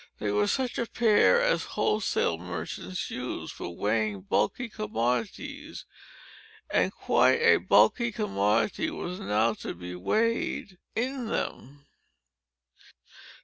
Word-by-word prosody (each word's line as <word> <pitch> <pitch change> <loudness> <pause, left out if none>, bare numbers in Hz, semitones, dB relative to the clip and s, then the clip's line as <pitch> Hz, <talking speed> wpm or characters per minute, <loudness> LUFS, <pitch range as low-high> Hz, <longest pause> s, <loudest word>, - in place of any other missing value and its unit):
They 105 - -2
were 105 0 +2
such 260 -2 -1
a 235 - -1
pair 230 - +4
as - - +2
wholesale 190 - +1
merchants 90 +1 -5
use, - - -5
for - - -6
weighing 105 0 0
bulky 105 - 0
commodities; 210 - -3 0.9
and - - +2
quite - - +3
a 465 - +7
bulky 235 -1 +4
commodity 115 - 0
was 180 - -5
now 110 +3 +1
to - - -5
be 90 +1 -7
weighed 200 - -1 0.2
in 250 +1 -2
them. 145 - -4
145 Hz, 110 wpm, -28 LUFS, -, 0.9 s, a